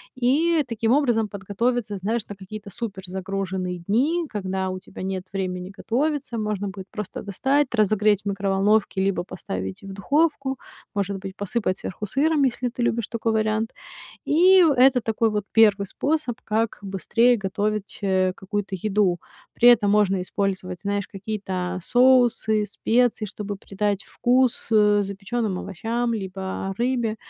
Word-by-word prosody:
И 300 +6 +2
таким 230 -1 0
образом 240 -6 +3
подготовиться, 205 +2 -2
знаешь, 220 +5 -1
на 205 - -6
какие-то 200 +2 -9
суперзагруженные 190 -3 -4
дни, 300 +11 +2
когда 190 -2 -2
у 185 - -4
тебя 185 +1 -11
нет 190 -1 -3
времени 185 -1 -3
готовиться. 260 +2 -1
Можно 210 -2 -2
будет 190 -1 -7
просто 210 -4 -6
достать, 265 +8 +1
разогреть 210 -2 +3
в - - -6
микроволновке 200 +1 +1
либо 195 -2 0
поставить 95 - -6
в 195 - -9
духовку. 275 +5 0 0.3
Может 200 -1 -1
быть, 190 0 -8
посыпать 205 -1 -2
сверху 200 +3 -5
сыром, 285 +6 +2
если 250 -1 0
ты 240 +1 -3
любишь 235 -2 0
такой 230 0 -1
вариант. 215 0 0 0.5
И 365 +5 +6
в 320 - +5
это 260 -1 +5
такой 225 0 +1
вот 210 -1 -2
1 205 -3 +4
способ, 300 -2 -1
как 225 +1 -1
быстрее 230 +5 +2
готовить, 205 +1 -2
э, 185 -1 +2
какую-то 195 +1 -4
еду. 195 -2 +1 0.4
При 245 - +7
этом 215 -4 +5
можно 200 -3 +3
использовать, 185 -1 -3
знаешь, 200 -1 -2
какие-то 190 -3 -4
соусы, 240 -2 +4
специи, 230 +3 +1
чтобы 205 0 -6
придать 200 +1 -2
вкус, 250 0 +2
э, 210 -1 +5
запечённым 200 +1 -3
овощам 230 +5 -2
либо 190 -1 -4
рыбе. 240 -2 0
210 Hz, 145 wpm, -24 LUFS, 195-240 Hz, 0.5 s, При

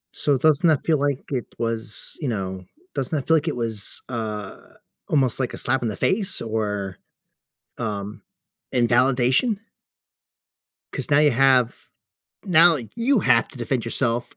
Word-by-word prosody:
So, 145 -3 +1
doesn't 155 +4 +3
that 155 -4 +1
feel 155 -3 +2
like 140 -1 -1
it 125 -3 -4
was, 115 -1 -2
you 140 - -1
know 95 -4 -4 0.3
doesn't 135 +4 -2
that 140 - -3
feel 160 0 +5
like 150 - -3
it 155 - -1
was, 115 -4 -1
uh, 110 -5 -5 0.5
almost 135 -6 +2
like 130 -2 -1
a - - -7
slap 135 -1 0
in 120 - -1
the 105 - -3
face 200 -3 +1
or, 105 -4 -3 0.8
um, 105 -2 -5 0.5
invalidation? 125 - +2 1.3
'Cause - - -4
now 140 - +6
you 150 -2 +5
have 130 -1 +3 0.7
now 170 -2 +6 0.2
you 240 +1 +2
have - - +3
to 135 - -13
defend 120 0 -1
yourself 120 0 -1
125 Hz, 150 wpm, -23 LUFS, 115-145 Hz, 1.3 s, now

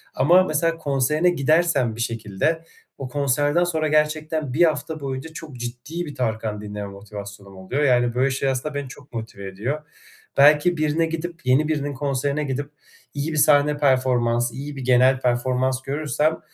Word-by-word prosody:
ama 175 +8 +5
mesela 165 0 0
konserine 150 +3 +1
gidersen 155 -6 +2
bir 115 - -5
şekilde, 115 +8 -1 0.3
o 135 - -5
konserden 145 +4 +1
sonra 160 -3 0
gerçekten 155 -2 0
1 170 - +4
hafta 160 -1 0
boyunca 135 +3 -5
çok 155 -4 -9
ciddi 120 +8 -5
bir 145 - -8
Tarkan 110 -4 -2
dinleme 105 -1 -6
motivasyonum 100 -1 -10
oluyor 125 +11 -2
yani, 120 -3 +3
böyle, 130 +2 +2
şey, 135 +1 0
aslında 135 +3 -2
beni 145 -2 -3
çok 140 +2 -14
motive 110 -4 -6
ediyor. 120 +11 -3 0.6
Belki 150 +4 +5
birine 155 +2 +1
gidip, 165 -1 -5
yeni 130 +4 +3
birinin 145 -2 -1
konserine 140 +2 -1
gidip 145 +1 -3 0.4
iyi 145 +3 -2
bir 155 - -3
sahne 145 0 +4
performans, 125 -4 +2
iyi 145 +2 -6
bir 135 - -6
genel 130 +1 +4
performans 130 +1 0
görürsem 150 +3 -1
140 Hz, 160 wpm, -23 LUFS, 125-155 Hz, 0.6 s, ama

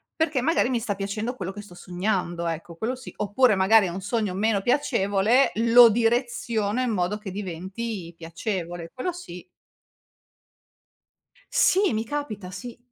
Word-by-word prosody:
perché 315 -5 0
magari 315 -2 +2
mi 250 -2 0
sta 220 -3 -3
piacendo 210 +5 -3
quello 190 -4 -5
che 205 - -8
sto 190 -4 -14
sognando, 175 -2 -2
ecco, 165 +1 -5
quello 225 +9 -2
sì, 255 -1 -11
oppure 210 +4 +3
magari 195 +2 +5
è - - -3
un 180 +3 -5
sogno 205 -1 -1
meno 205 +1 +1
piacevole, 235 -2 +2
lo 235 +2 +7
direziono 235 -1 0
in 255 - 0
modo 190 0 -1
che 210 -2 -7
diventi 190 0 -5
piacevole. 170 0 -5
Quello 350 +8 -3
sì. 180 - -9 2.1
Sì, 390 -3 +3
mi 220 +1 -1
capita, 225 -9 -5
sì. 225 +7 -8
210 Hz, 150 wpm, -25 LUFS, 185-240 Hz, 2.1 s, lo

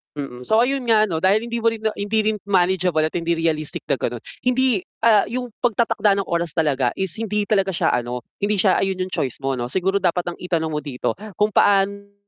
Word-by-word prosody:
Mm, 125 -4 -7
so 220 +1 +3
ayun 265 +1 0
nga 215 -2 +4
ano 160 - -1
dahil 195 +5 +3
hindi 235 - -2
mo 230 0 +2
rin 220 - -8
na 220 - +1
hindi 215 +2 0
rin 215 0 0
manageable 180 -3 +2
at 155 +2 -1
hindi 170 0 0
realistic 160 -2 -1
na - - +2
gano'n. 120 -2 -3 0.2
Hindi 250 -5 +2 0.2
ah, 220 -3 +5
'yung 250 +1 -4
pagtatakda 225 -4 +1
ng - - -9
oras 170 -2 -1
talaga 140 -7 +1
is 190 -4 -2
hindi 210 -2 -1
talaga 195 -2 +2
siya - - +1
ano, 125 0 -2 0.2
hindi 205 -1 0
siya 190 -3 +3
ayun 190 -1 -1
'yung 185 - -2
choice 135 0 -2
mo 135 -1 -1
'no. 120 - -2
Siguro 190 +9 0
dapat 180 -2 +1
ang 175 - -8
itanong 165 -3 -2
mo 150 - -3
dito 130 -3 -3 0.2
kung 210 +3 +1
paano 200 0 +2
190 Hz, 220 wpm, -21 LUFS, 160-215 Hz, 0.2 s, ah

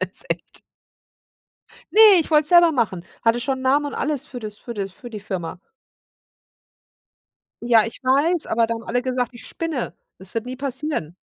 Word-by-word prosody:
Jetzt - - -1
echt. - - -4 1.3
Ne, 435 - +3 0.2
ich 320 - -8
wollte 300 0 +5
es 300 - -1
selber 345 -2 +7
machen 195 - -1 0.2
hatte 230 +1 +2
schon 265 0 -2
'n - - -8
Namen 280 +3 +2
und - - -7
alles 295 -3 -2
für 245 - -8
das 210 -2 -7
für 235 - -8
das 195 -3 -5
für 240 - -11
die 215 -2 -7
Firma. 185 -3 -5 2.0
Ja, 230 -2 +5
ich 230 - -9
weiß, 295 +6 +2
aber 230 0 +2
da 230 - -2
haben 230 0 -7
alle 245 +2 -1
gesagt, 250 -2 -2
ich - - -11
spinne. 325 -7 -4 0.2
Das 190 0 -14
wird 230 +1 -2
nie 255 - -5
passieren. 270 - -3
245 Hz, 185 wpm, -22 LUFS, 220-285 Hz, 2.0 s, selber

